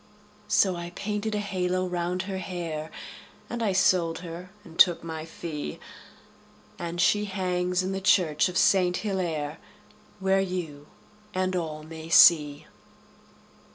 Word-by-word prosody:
So 190 Hz, -2 st, +3 dB
I 170 Hz, 0 st, -6 dB
painted 210 Hz, +1 st, -2 dB
a -, -, 0 dB
halo 185 Hz, -2 st, -1 dB
round 180 Hz, +1 st, -2 dB
her 190 Hz, 0 st, -4 dB
hair, 170 Hz, -4 st, -5 dB, 0.6 s
And 240 Hz, -1 st, -3 dB
I 215 Hz, -3 st, +1 dB
sold 175 Hz, -3 st, +2 dB
her 170 Hz, +2 st, -8 dB
and 165 Hz, -1 st, -14 dB
took 175 Hz, -3 st, +6 dB
my 160 Hz, -1 st, -5 dB
fee, 155 Hz, -, -6 dB, 1.0 s
And 170 Hz, 0 st, -4 dB
she 205 Hz, +4 st, +3 dB
hangs 180 Hz, -2 st, -1 dB
in 190 Hz, -, -2 dB
the 195 Hz, 0 st, -3 dB
church 175 Hz, -5 st, +3 dB
of 180 Hz, -, -3 dB
Saint 180 Hz, -1 st, +3 dB
Hillaire, 165 Hz, -7 st, -2 dB, 0.6 s
Where 195 Hz, 0 st, +2 dB
you 165 Hz, -6 st, -5 dB, 0.5 s
and 185 Hz, 0 st, 0 dB
all 155 Hz, -3 st, -3 dB
may 160 Hz, +1 st, -9 dB
see. 150 Hz, -4 st, +6 dB
180 Hz, 135 wpm, -27 LUFS, 165-190 Hz, 1.0 s, took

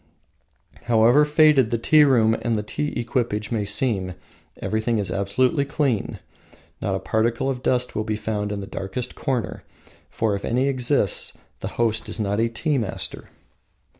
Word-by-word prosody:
However 120 Hz, +5 st, +5 dB
faded 150 Hz, -5 st, +4 dB
the 115 Hz, -, 0 dB
tea 150 Hz, +6 st, +5 dB
room 115 Hz, -5 st, +4 dB
and 120 Hz, -2 st, 0 dB
the 105 Hz, -, -2 dB
tea 145 Hz, +5 st, -3 dB
equipage 115 Hz, -3 st, -2 dB
may 110 Hz, -3 st, 0 dB
seem, 100 Hz, -4 st, -1 dB, 0.4 s
everything 110 Hz, +1 st, -1 dB
is 100 Hz, -4 st, -1 dB
absolutely 125 Hz, -, +1 dB
clean. 140 Hz, -6 st, -1 dB, 0.6 s
Not -, -, -1 dB
a -, -, -2 dB
particle 115 Hz, +4 st, 0 dB
of 125 Hz, -2 st, -5 dB
dust 125 Hz, -1 st, 0 dB
will 110 Hz, -, 0 dB
be 110 Hz, 0 st, -2 dB
found 105 Hz, -1 st, -3 dB
in 100 Hz, -1 st, -3 dB
the -, -, -6 dB
darkest 110 Hz, +5 st, -4 dB
corner, 125 Hz, -7 st, -3 dB, 0.5 s
for 110 Hz, -2 st, 0 dB
if 100 Hz, -, -3 dB
any 125 Hz, +3 st, +1 dB
exists 130 Hz, -6 st, +1 dB, 0.2 s
the -, -, -4 dB
host 110 Hz, -2 st, 0 dB
is -, -, -2 dB
not 100 Hz, 0 st, 0 dB
a 115 Hz, +1 st, +2 dB
tea 140 Hz, +5 st, 0 dB
master. 110 Hz, -5 st, -5 dB
115 Hz, 165 wpm, -23 LUFS, 105-130 Hz, 0.6 s, However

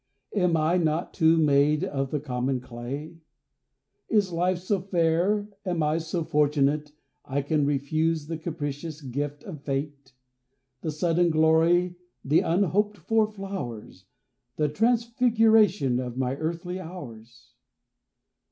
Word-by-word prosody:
Am 180 Hz, -4 st, +2 dB
I 160 Hz, +3 st, +2 dB
not, 160 Hz, 0 st, 0 dB
too, 160 Hz, +1 st, +4 dB
made 150 Hz, +1 st, +3 dB
of 135 Hz, -7 st, -2 dB
the 150 Hz, -, -1 dB
common 130 Hz, -1 st, -2 dB
clay? 130 Hz, +7 st, -7 dB, 0.9 s
Is 205 Hz, -4 st, +2 dB
life 180 Hz, +2 st, +1 dB
so 185 Hz, +3 st, -1 dB
fair, 180 Hz, +3 st, +1 dB, 0.2 s
am 175 Hz, -5 st, -1 dB
I 155 Hz, +2 st, +1 dB
so 165 Hz, +1 st, -3 dB
fortunate, 150 Hz, -1 st, +1 dB, 0.3 s
I 140 Hz, +1 st, -2 dB
can 145 Hz, 0 st, +1 dB
refuse 155 Hz, +3 st, 0 dB
the 160 Hz, +1 st, -5 dB
capricious 155 Hz, -1 st, -5 dB
gift 145 Hz, +2 st, -4 dB
of 155 Hz, -7 st, -8 dB
Fate, 140 Hz, -1 st, -4 dB, 0.7 s
The 160 Hz, -, -3 dB
sudden 170 Hz, +3 st, +1 dB
glory, 165 Hz, +3 st, +3 dB, 0.3 s
the 150 Hz, +4 st, +4 dB
unhoped 200 Hz, +4 st, +1 dB
for 225 Hz, -1 st, +1 dB
flowers, 190 Hz, -, -7 dB, 0.5 s
The 150 Hz, -1 st, +1 dB
transfiguration 225 Hz, -, +3 dB
of 125 Hz, -1 st, -5 dB
my 130 Hz, 0 st, 0 dB
earthly 170 Hz, +4 st, -4 dB
hours? 120 Hz, -12 st, -10 dB
160 Hz, 125 wpm, -26 LUFS, 140-180 Hz, 0.9 s, too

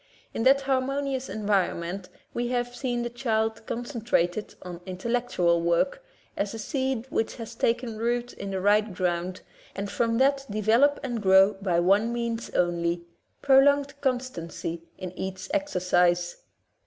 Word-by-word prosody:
In -, -, -2 dB
that 275 Hz, +1 st, +6 dB
harmonious 270 Hz, 0 st, -1 dB
environment 195 Hz, -3 st, -1 dB, 0.2 s
we 240 Hz, 0 st, -1 dB
have 245 Hz, 0 st, -2 dB
seen 245 Hz, -3 st, -2 dB
the 240 Hz, -, -2 dB
child 225 Hz, -3 st, -1 dB
concen 240 Hz, +1 st, -4 dB
trated 210 Hz, -5 st, 0 dB
on 180 Hz, -1 st, -8 dB
intellectual 185 Hz, -3 st, 0 dB
work, 170 Hz, -, +1 dB, 0.3 s
as 205 Hz, +2 st, -2 dB
a -, -, -5 dB
seed 260 Hz, 0 st, -2 dB
which 225 Hz, -, -1 dB
has 230 Hz, -1 st, -7 dB
taken 230 Hz, -1 st, -1 dB
root 240 Hz, +1 st, -1 dB
in 200 Hz, -, -6 dB
the 190 Hz, -1 st, -2 dB
right 205 Hz, +1 st, +2 dB
ground, 180 Hz, 0 st, -1 dB, 0.3 s
and 200 Hz, +1 st, -4 dB
from 230 Hz, -1 st, +1 dB
that 275 Hz, +1 st, +3 dB
develop 225 Hz, +8 st, +3 dB
and 240 Hz, -4 st, -3 dB
grow 190 Hz, +1 st, +6 dB
by 190 Hz, -3 st, 0 dB
one 200 Hz, +6 st, +3 dB
means 235 Hz, -1 st, -3 dB
only 170 Hz, -1 st, 0 dB, 0.2 s
— -, -, -45 dB
prolonged 280 Hz, +1 st, +5 dB
constancy 245 Hz, -, -3 dB, 0.2 s
in 185 Hz, -1 st, -6 dB
each 190 Hz, 0 st, -6 dB
exercise. 180 Hz, -10 st, +1 dB
220 Hz, 145 wpm, -27 LUFS, 185-250 Hz, 0.3 s, that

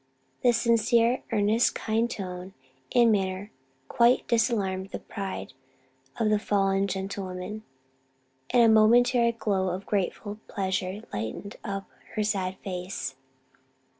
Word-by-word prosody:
The 245 Hz, -, +5 dB
sincere, 235 Hz, +1 st, +3 dB
earnest, 220 Hz, +2 st, +2 dB
kindly 225 Hz, +1 st, 0 dB
tone 185 Hz, -4 st, -6 dB, 0.4 s
and 235 Hz, -2 st, +6 dB
manner 195 Hz, 0 st, -1 dB, 0.4 s
quite 240 Hz, -, +3 dB
disarmed 200 Hz, -5 st, +1 dB
the -, -, -4 dB
pride 195 Hz, -9 st, -6 dB, 0.7 s
of 215 Hz, -2 st, +2 dB
the 210 Hz, -, +3 dB
fallen 195 Hz, -1 st, +1 dB
gentlewoman, 190 Hz, +1 st, -4 dB, 0.9 s
and 245 Hz, -1 st, +5 dB
a -, -, +6 dB
momentary 235 Hz, +2 st, +5 dB
glow 200 Hz, -5 st, -1 dB
of 185 Hz, +2 st, -4 dB
grateful 205 Hz, +1 st, -2 dB
pleasure 190 Hz, +1 st, -2 dB
lighted 110 Hz, -, -5 dB
up 195 Hz, -2 st, -4 dB, 0.3 s
her 215 Hz, -, +1 dB
sad 190 Hz, -3 st, -1 dB
face. 180 Hz, -7 st, -4 dB
205 Hz, 115 wpm, -27 LUFS, 190-230 Hz, 0.9 s, and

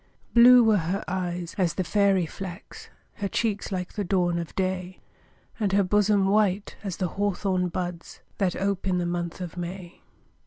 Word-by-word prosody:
Blue 245 Hz, +1 st, +8 dB
were 220 Hz, -2 st, +4 dB
her 180 Hz, +5 st, -2 dB
eyes 175 Hz, -1 st, -3 dB
as 180 Hz, -3 st, +1 dB
the 185 Hz, -, 0 dB
fairy 195 Hz, 0 st, +2 dB
flax, 185 Hz, +3 st, -9 dB, 0.3 s
Her 200 Hz, -, -2 dB
cheeks 210 Hz, +1 st, -2 dB
like 180 Hz, -2 st, -4 dB
the 210 Hz, -, -2 dB
dawn 175 Hz, -2 st, +1 dB
of 170 Hz, -2 st, -7 dB
day, 185 Hz, -1 st, -2 dB, 0.6 s
And 200 Hz, -3 st, 0 dB
her 200 Hz, 0 st, +4 dB
bosom 205 Hz, +1 st, +3 dB
white 200 Hz, -1 st, +1 dB
as 195 Hz, -4 st, -4 dB
the 185 Hz, -2 st, -1 dB
hawthorn 190 Hz, -2 st, -1 dB
buds, 175 Hz, -1 st, -5 dB, 0.2 s
That 190 Hz, -3 st, +1 dB
ope 195 Hz, 0 st, -2 dB
in 185 Hz, -1 st, +1 dB
the 175 Hz, -, -1 dB
month 175 Hz, 0 st, -3 dB
of 180 Hz, -1 st, -6 dB
May. 175 Hz, 0 st, -7 dB
185 Hz, 170 wpm, -26 LUFS, 175-200 Hz, 0.6 s, Blue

